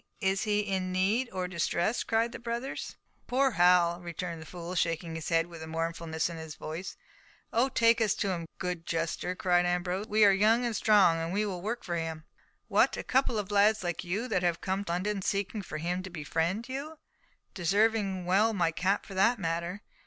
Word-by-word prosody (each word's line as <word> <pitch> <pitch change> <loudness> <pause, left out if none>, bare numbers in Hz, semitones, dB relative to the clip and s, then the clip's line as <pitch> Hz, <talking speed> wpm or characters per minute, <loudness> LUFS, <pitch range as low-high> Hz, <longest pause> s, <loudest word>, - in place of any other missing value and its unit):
is 195 -1 0
he 210 -1 +2
in 190 -2 -2
need, 205 +7 +1
or 185 -1 -2
distress?" 175 +4 0
cried 230 +1 +1
the - - -8
brothers. 235 +3 -4 0.3
"Poor 265 +2 +2
Hal!" 175 -2 +4
returned 170 -1 -5
the 160 - -10
fool, 175 0 -7
shaking 165 -1 -1
his 160 -1 -5
head 165 -1 +3
with 170 -2 -10
mournfulness 165 0 -2
in 170 -1 -6
his 160 -1 -8
voice. 165 +5 -6 0.6
"Oh, 245 +4 +3
take 230 -2 +3
us 215 -2 +2
to 200 - -1
him, 170 -2 -4
good—good 180 -2 -4
jester," 165 +2 -2
cried 175 -1 +2
Ambrose. 180 +3 -1
"We 215 0 +5
are 200 - +7
young 220 +5 +3
and 235 -2 -1
strong. 170 -7 +4
We 205 +3 0
will 185 -4 -4
work 225 +5 -3
for 175 -2 -2
him." 160 -1 -4 0.4
"What, - - +3
a - - -4
couple 260 -3 +1
of 205 -1 -3
lads 205 +1 +4
like 175 -1 -2
you, 195 +7 -2
that 185 - +1
have 175 -2 +1
come 190 +1 -2
to 170 - -3
London 195 +3 -1
seeking 200 +2 -1
for 185 - -6
him 175 +3 -2
to 190 - -8
befriend 170 +6 -2
you—deserving 215 - -2
well 205 +5 +3
my 170 -4 +2
cap 190 +5 0
for 200 - -10
that 225 +6 +3
matter. 170 +1 -3
185 Hz, 195 wpm, -29 LUFS, 170-215 Hz, 0.6 s, are